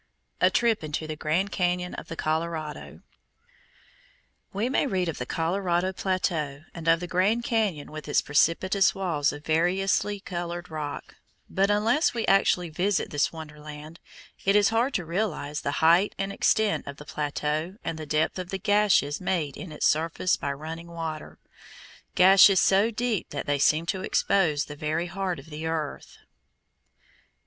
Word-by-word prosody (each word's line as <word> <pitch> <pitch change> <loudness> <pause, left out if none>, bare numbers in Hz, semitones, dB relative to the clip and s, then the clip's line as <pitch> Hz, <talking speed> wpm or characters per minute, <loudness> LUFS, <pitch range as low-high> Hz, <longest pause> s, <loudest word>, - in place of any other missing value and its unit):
A - - +5
TRIP 230 -6 +1
INTO 155 +1 -3
THE 155 0 -5
GRAND 170 +6 -1
CAÑON 180 0 -1
OF - - -8
THE 165 - -6
COLORADO 155 -1 -3 1.5
We 205 +5 -1
may 270 +2 +1
read 185 -6 0
of 165 - -4
the 125 - -4
Colorado 175 +2 0
plateau, 165 -7 -2
and 165 -1 -8
of 165 +1 +4
the 175 - -4
Grand 200 +7 +1
Cañon 210 -11 -1
with 155 0 -8
its 145 - +3
precipitous 185 +6 +2
walls 165 -7 0
of 145 +1 -10
variously 190 +5 +1
colored 175 -2 -5
rock, 150 -2 -6 0.3
but 195 +1 +1
unless 225 +9 +2
we 230 - -1
actually 180 -3 +2
visit 185 +5 0
this 145 -1 +1
wonderland, 150 0 -10 0.4
it 195 +1 +3
is 205 -1 +5
hard 235 +4 +1
to 175 - -1
realize 165 -5 -2
the 140 - -2
height 175 +5 +4
and 195 0 -3
extent 215 0 +1
of 140 0 -7
the 150 - -11
plateau 150 +4 -2
and 160 - -4
the 155 - -7
depth 155 +5 0
of 180 -1 -6
the 195 - -3
gashes 200 -7 +2
made 165 -7 -1
in 185 - -8
its 150 - -2
surface 165 +3 +2
by 140 - -3
running 160 +4 -7
water, 165 -2 -6 0.8
gashes 190 +1 +7
so 195 +4 +4
deep 230 -3 -2
that - - -5
they 145 -1 0
seem 155 +3 +3
to 190 +2 -2
expose 165 -6 +1
the 150 - -9
very 155 +2 -2
heart 185 0 -3
of 160 - -13
the 155 +2 -5
earth. 155 -3 -4
170 Hz, 165 wpm, -26 LUFS, 155-195 Hz, 1.5 s, gashes